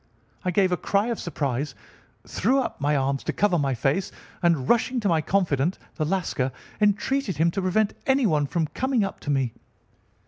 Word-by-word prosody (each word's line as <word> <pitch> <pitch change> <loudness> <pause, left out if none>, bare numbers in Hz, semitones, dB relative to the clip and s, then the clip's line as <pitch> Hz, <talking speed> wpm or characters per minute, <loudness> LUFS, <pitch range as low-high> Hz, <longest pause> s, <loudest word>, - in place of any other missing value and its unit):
I 185 - 0
gave 185 +1 +2
a 180 - +2
cry 200 +6 +1
of 235 - -2
surprise, 140 -4 -2 0.5
threw 250 +8 +1
up 250 - -3
my 145 +1 +2
arms 135 0 0
to - - -1
cover 195 -5 +2
my 135 -2 0
face, 140 - 0 0.3
and, 165 -7 +2
rushing 240 +2 +2
to 210 - 0
my 165 -4 +3
confidant, 170 -3 +1 0.2
the 155 - -2
Lascar, 150 -7 -1 0.3
entreated 210 - +1
him 165 +2 +3
to 195 - -2
prevent 200 +3 +1
anyone 210 - +3
from 165 +2 0
coming 255 - 0
up 195 - -4
to - - -7
me. 135 -5 +1
175 Hz, 180 wpm, -25 LUFS, 145-205 Hz, 0.5 s, my